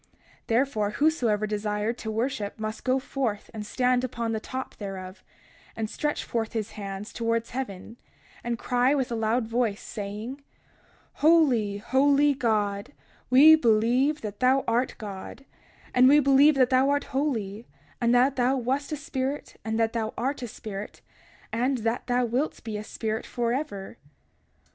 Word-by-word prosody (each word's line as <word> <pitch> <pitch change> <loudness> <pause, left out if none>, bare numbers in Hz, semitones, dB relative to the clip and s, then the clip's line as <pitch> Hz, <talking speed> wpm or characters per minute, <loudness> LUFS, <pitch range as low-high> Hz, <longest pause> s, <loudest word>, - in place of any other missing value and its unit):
31:14 - - -36 0.4
Therefore, 225 -3 +1
whosoever 235 -5 +1
desired 210 +1 -2
to 220 - -5
worship 220 -2 -2
must 215 0 -4
go 255 0 +2
forth 255 -5 -3
and 215 -1 -5
stand 250 +3 +1
upon 235 -2 -2
the 220 - -1
top 260 +4 -6
thereof, 190 -2 -7 0.5
and 220 -1 -3
stretch 295 -1 -2
forth 225 -2 -3
his 220 -1 -3
hands 200 0 -7
towards 230 0 -1
heaven, 230 -3 -6 0.5
and 235 0 -2
cry 250 +4 +2
with 260 -4 -1
a - - -1
loud 225 +2 +1
voice, 230 -2 0
saying: 210 +5 -6
31:15 - - -27 0.8
Holy, 270 -11 +4
holy 280 +6 +3
God; 210 -3 -1 0.4
we 280 +5 +8
believe 250 +3 +2
that 205 -2 -6
thou 260 +1 +3
art 240 +3 +1
God, 205 +6 -8 0.5
and 255 +1 +6
we 295 +2 +7
believe 280 +2 +5
that 255 -2 +3
thou 260 +2 +4
art 285 0 +1
holy, 230 -6 -2 0.3
and 235 0 +3
that 260 +3 +3
thou 255 +2 +2
wast 265 +4 -1
a 305 - -2
spirit, 275 0 -4
and 220 0 -2
that 225 0 +1
thou 225 -2 -2
art 270 +3 -2
a 245 - -4
spirit, 210 -2 -8 0.5
and 250 +4 +1
that 230 +2 -2
thou 245 0 +2
wilt 250 +6 -2
be 220 -1 -5
a 210 - -4
spirit 220 +1 -3
forever. 240 -4 -3
235 Hz, 160 wpm, -26 LUFS, 215-265 Hz, 0.8 s, we